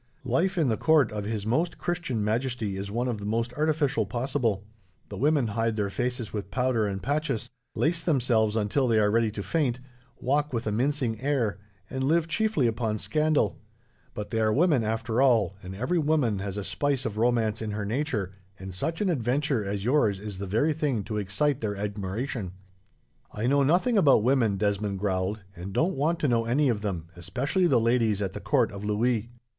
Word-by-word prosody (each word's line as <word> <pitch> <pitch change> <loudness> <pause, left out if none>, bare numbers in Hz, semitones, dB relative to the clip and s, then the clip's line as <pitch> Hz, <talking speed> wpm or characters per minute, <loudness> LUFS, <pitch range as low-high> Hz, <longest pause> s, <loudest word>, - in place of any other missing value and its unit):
Life 175 +10 +1
in 160 -5 +3
the 110 -3 +1
court 155 -3 +4
of 105 -1 -4
His 105 -1 -3
Most 160 +10 0
Christian 170 -11 -2
Majesty 115 -2 -1
is 100 +1 -5
one 120 +4 -1
of 115 -4 -2
the 100 - -6
most 115 +3 -1
artificial 150 - +1
possible. 120 -3 -1 0.5
The 100 - -7
women 145 +1 +2
hide 115 +1 0
their 100 -2 -1
faces 125 0 -3
with 100 -3 -4
powder 125 -2 +1
and 95 -1 -4
patches, 145 -5 -1 0.2
lace 170 +2 +1
themselves 120 - +2
until 115 +5 +1
they 115 -2 +3
are 105 -1 +3
ready 115 0 +2
to 105 -1 -5
faint, 130 -5 0 0.4
walk 145 +2 0
with 115 0 -2
a 105 - 0
mincing 125 -1 0
air, 130 -8 0 0.3
and 130 0 -3
live 160 +4 +2
chiefly 195 - +1
upon 115 -2 0
scandal; 155 +4 +1 0.6
but 105 - -5
they 115 - 0
are 110 -1 +3
women, 150 -1 +3
after 115 +2 0
all, 120 -7 +3
and 95 0 -8
every 130 - 0
woman 145 -9 +1
has 100 0 -4
a 100 - -3
spice 140 +3 -1
of 105 - -3
romance 115 -2 +1
in 110 - -3
her 105 0 -3
nature, 110 - -2 0.2
and 95 0 -8
such 160 - -3
an 205 - +2
adventure 135 -2 0
as 100 0 -3
yours 120 -7 +2
is 100 -2 -7
the 100 - -4
very 115 +11 +2
thing 145 -8 -1
to 105 +1 -4
excite 115 +8 0
their 105 -2 -2
admiration." 105 +1 -3 0.8
"I 105 - -3
know 140 +3 +3
nothing 185 - +3
about 140 - +5
women," 120 -5 +2
Desmond 100 -1 0
growled, 95 +1 -1
"and 90 +2 -7
don't 165 - +1
want 155 +5 +1
to 150 - +2
know 115 -2 +2
any 135 +4 +2
of 110 -4 0
them, 95 -6 -3
especially 130 - 0
the 130 -7 +4
ladies 115 -3 +2
at 95 -2 -2
the - - -6
court - - +2
of 100 0 -8
Louis." 110 +2 0
115 Hz, 195 wpm, -27 LUFS, 105-140 Hz, 0.8 s, about